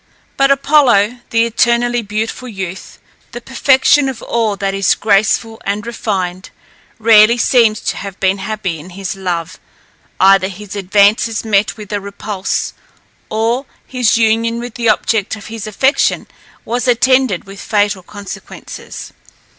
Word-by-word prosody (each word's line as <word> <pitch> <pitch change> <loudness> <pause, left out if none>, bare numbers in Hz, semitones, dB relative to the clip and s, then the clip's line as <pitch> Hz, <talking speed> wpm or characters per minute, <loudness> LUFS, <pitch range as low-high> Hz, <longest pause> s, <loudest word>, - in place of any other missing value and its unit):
But 275 0 +3
Apollo, 260 -6 +3
the 230 0 +2
eternally 240 +1 +1
beautiful 220 +4 -4
youth, 190 -4 -7 0.4
the 240 - -5
perfection 265 +2 +3
of 260 - -7
all 225 -3 0
that 195 0 -2
is 195 -2 +2
graceful 220 +2 +1
and 205 +2 -3
refined, 190 -6 -3 0.5
rarely 225 +1 +6
seems 230 -2 +3
to - - -3
have 195 -1 -7
been 195 0 +1
happy 195 -4 -4
in 160 +5 -11
his 195 0 -4
love; 180 -2 -4 0.6
either 195 0 +5
his 200 +1 -9
advances 205 +3 +2
met 210 0 +1
with 210 -1 -8
a 205 - -1
repulse, 200 0 -4 0.6
or 230 +5 -1 0.2
his 250 -4 +1
union 230 +1 +1
with 240 -1 -7
the 235 -1 0
object 215 0 +1
of 210 - -12
his 220 -1 -6
affection 265 +7 +1 0.4
was 245 +3 -2
attended 255 -4 +2
with 195 0 -11
fatal 205 -2 0
consequences. 200 +2 -9
215 Hz, 140 wpm, -15 LUFS, 195-235 Hz, 0.6 s, rarely